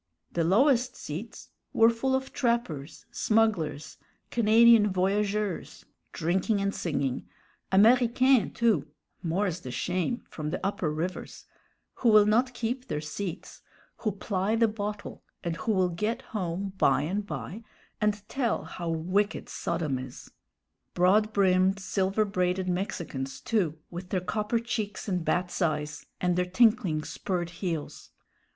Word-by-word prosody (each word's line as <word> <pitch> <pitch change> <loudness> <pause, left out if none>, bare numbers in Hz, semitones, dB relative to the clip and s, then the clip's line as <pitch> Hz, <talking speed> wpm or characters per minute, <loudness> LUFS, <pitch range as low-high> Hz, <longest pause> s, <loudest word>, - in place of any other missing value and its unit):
The 170 - 0
lowest 250 - +3
seats 170 +10 -7 0.2
were 225 +1 +6
full 265 +3 0
of 265 0 -3
trappers, 235 - -2
smugglers, 220 - 0 0.3
Canadian 225 -1 +6
voyageurs, 200 +1 -1 0.3
drinking 190 +5 0
and 200 0 0
singing; 140 -6 -2 0.4
Américains, 240 +3 +4
too 215 -12 +2 0.3
more's 180 +1 -1
the 130 - -8
shame 180 - -2
from 150 -1 -5
the - - -2
upper 195 -5 -1
rivers 170 +4 -5 0.5
who 240 - +3
will 215 -1 +7
not 245 +4 +2
keep 245 +3 -3
their 150 - -2
seats 165 +4 -6 0.4
who 215 - -1
ply 200 +1 -1
the 230 0 +4
bottle, 210 -1 -5 0.2
and 170 -2 -2
who 225 - -1
will 185 -3 +2
get 215 +9 -2
home 190 -1 -3
by 135 +1 +4
and 200 +6 -2
by 150 - -6 0.4
and 210 -1 0
tell 240 -2 -1
how 170 -2 -5
wicked 185 +6 0
Sodom 160 -6 -2
is; 130 -1 -9 0.6
broad 205 +5 +4
brimmed, 190 -1 +3
silver 195 +2 0
braided 185 -1 0
Mexicans 170 -8 -3
too, 165 0 0
with 180 +1 -7
their 185 - 0
copper 210 +5 -1
cheeks 220 -4 -3
and 180 -4 -1
bat's 180 +3 -1
eyes, 150 -2 -1
and 180 -1 +1
their 180 0 +1
tinkling 190 -6 +3
spurred 175 -1 -3
heels. 165 -6 -4
195 Hz, 135 wpm, -28 LUFS, 170-220 Hz, 0.6 s, will